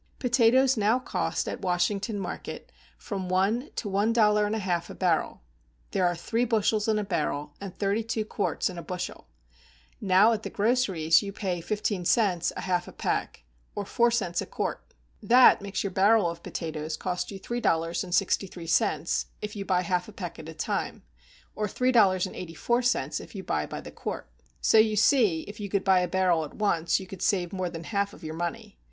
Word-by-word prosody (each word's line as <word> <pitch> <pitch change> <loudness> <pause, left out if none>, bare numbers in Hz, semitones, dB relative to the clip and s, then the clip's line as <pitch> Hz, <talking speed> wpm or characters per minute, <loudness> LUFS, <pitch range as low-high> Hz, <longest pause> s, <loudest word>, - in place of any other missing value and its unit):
Potatoes 250 +1 +4
now 215 +3 +3
cost 255 - -2
at - - -4
Washington 195 +4 0
market 190 -3 -6 0.3
from 190 -4 -5
one 205 +9 +1
to 215 - -3
one 200 +3 +1
dollar 210 -2 +4
and 210 - -1
a - - -1
half 175 -4 -2
a - - -8
barrel; 170 - 0 0.5
there 185 -2 +2
are 175 - 0
three 225 +8 -1
bushels 220 -2 +1
in 220 -1 +2
a 210 - 0
barrel, 150 -6 -2
and 195 -3 -7
thirty 200 +2 0
two 225 -1 -2
quarts 210 - -1
in 180 -2 -5
a - - -5
bushel; 180 +1 -6 0.7
now 200 +4 +5
at 215 - -2
the - - -5
groceries 200 -8 +2
you 200 - -5
pay 190 -4 -3
fifteen 205 +1 -2
cents 180 -3 +2
a - - -3
half 180 -1 -1
a - - -8
peck, - - -3 0.3
or 205 - -3
four 235 +3 +3
cents 200 -7 -1
a - - -6
quart; - - -4 0.3
that 250 -2 +6
makes 200 -1 -3
your 200 - -2
barrel 200 +1 +4
of 170 0 -5
potatoes 155 -2 -4
cost 180 -1 -3
you 195 - -6
three 240 +5 -4
dollars 165 -1 +1
and 180 -1 -2
sixty 195 +1 +1
three 175 -2 -9
cents, 160 -1 +1
if 210 0 -6
you 200 - -4
buy 185 -2 +1
half 180 0 -1
a - - -10
peck 175 -5 -7
at 160 - -8
a - - -7
time; 155 - -3 0.5
or 210 - -1
three 255 +5 +1
dollars 195 -6 +4
and 185 - -8
eighty 170 -2 -7
four 240 +8 +1
cents 245 0 0
if - - -12
you - - -5
buy - - -1
by - - -6
the - - -10
quart. - - -5 0.3
So 220 - +5
you 215 0 +4
see 210 - +4
if 205 +5 -10
you 205 -1 -5
could 195 0 0
buy 190 -1 +4
a 180 - 0
barrel 180 -2 +2
at 150 - -9
once 170 -6 +1
you 190 - -8
could 185 -1 -10
save 185 -6 0
more 185 -2 -2
than 165 -1 -7
one - - -9
half 200 -1 0
of - - -14
your 155 0 -5
money. 170 - -5
195 Hz, 215 wpm, -27 LUFS, 175-215 Hz, 0.7 s, that